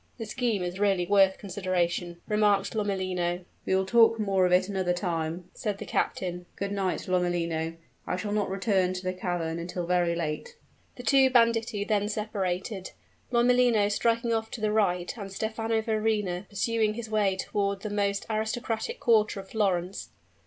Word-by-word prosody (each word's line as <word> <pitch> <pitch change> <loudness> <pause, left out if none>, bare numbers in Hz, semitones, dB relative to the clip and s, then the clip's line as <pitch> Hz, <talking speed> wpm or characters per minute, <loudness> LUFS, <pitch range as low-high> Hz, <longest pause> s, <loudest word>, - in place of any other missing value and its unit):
"The 225 - -5
scheme 225 -3 -1
is 180 +2 -4
really 195 -3 +2
worth 195 0 +4
consideration," 180 -3 -2
remarked 205 -2 +2
Lomellino. 185 -4 -1 0.2
"We 190 - +3
will 190 0 +2
talk 230 +2 +5
more 195 -3 +2
of - - -2
it 185 +1 +4
another 190 -3 0
time," 170 -1 -3
said 210 -3 -3
the - - -7
captain. 180 -1 -2
"Good 200 0 -3
night, 195 -2 -2
Lomellino. 170 -3 0 0.3
I - - 0
shall 205 +2 -3
not 210 -1 0
return 190 -1 +1
to 185 0 -5
the 185 0 -1
cavern 175 -3 -2
until 175 +1 -4
very 175 -1 +2
late." 170 - -4 0.4
The 245 - -9
two 270 0 +5
banditti 230 -4 +3
then 205 -1 0
separated 195 -2 -3 0.4
Lomellino 240 -3 +4
striking 230 +2 +1
off 225 0 -1
to 225 - -7
the 215 -1 +1
right, 180 -5 +1
and 195 -1 -6
Stephano 225 +2 -1
Verrina 215 -4 0
pursuing 215 +1 0
his 235 -1 -5
way 210 -3 +1
toward 200 0 -1
the 215 - -4
most 200 -1 0
aristocratic 225 - -2
quarter 220 -3 +3
of 195 - -10
Florence. 190 -3 -1
200 Hz, 165 wpm, -28 LUFS, 180-220 Hz, 0.4 s, talk